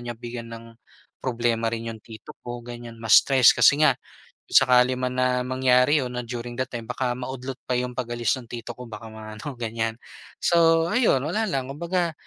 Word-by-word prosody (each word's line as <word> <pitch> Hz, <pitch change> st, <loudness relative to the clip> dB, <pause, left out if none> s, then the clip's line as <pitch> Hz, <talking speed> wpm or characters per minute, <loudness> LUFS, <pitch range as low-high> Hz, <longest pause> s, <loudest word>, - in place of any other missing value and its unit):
niya 120 Hz, -1 st, -6 dB
bigyan 120 Hz, 0 st, -7 dB
ng 115 Hz, 0 st, -9 dB, 0.6 s
problema 115 Hz, -2 st, 0 dB
rin 115 Hz, 0 st, -4 dB
'yong 110 Hz, -, -12 dB
tito 110 Hz, -1 st, -12 dB
ko, 120 Hz, -1 st, -7 dB
ganyan, 120 Hz, -1 st, -9 dB
ma-stress 120 Hz, +3 st, +6 dB
kasi 140 Hz, +6 st, +5 dB
nga 140 Hz, -, +6 dB, 0.5 s
kung -, -, +5 dB
sakali 125 Hz, 0 st, +4 dB
man 125 Hz, 0 st, -2 dB
na 125 Hz, 0 st, +2 dB
mangyari 130 Hz, +2 st, +3 dB
'yon 125 Hz, -1 st, -4 dB
na 125 Hz, -1 st, -5 dB
during 120 Hz, +1 st, -6 dB
that 130 Hz, -, 0 dB
time, 115 Hz, -2 st, -6 dB
baka 125 Hz, +1 st, -2 dB
maudlot 130 Hz, 0 st, -6 dB
pa -, -, -3 dB
'yong 125 Hz, 0 st, -3 dB
pag-alis 120 Hz, -1 st, -1 dB
ng 120 Hz, -3 st, -11 dB
tito 120 Hz, -1 st, -6 dB
ko 125 Hz, -, -9 dB
baka 110 Hz, +1 st, -8 dB
ma-ano, 110 Hz, +5 st, -8 dB
ganyan. 115 Hz, -1 st, -3 dB, 0.5 s
So 165 Hz, 0 st, +4 dB
ayon, 230 Hz, -, +3 dB
wala 215 Hz, +8 st, -1 dB
lang, 135 Hz, -5 st, -2 dB
kumbaga, 170 Hz, +2 st, -1 dB
125 Hz, 185 wpm, -24 LUFS, 115-130 Hz, 0.6 s, ma-stress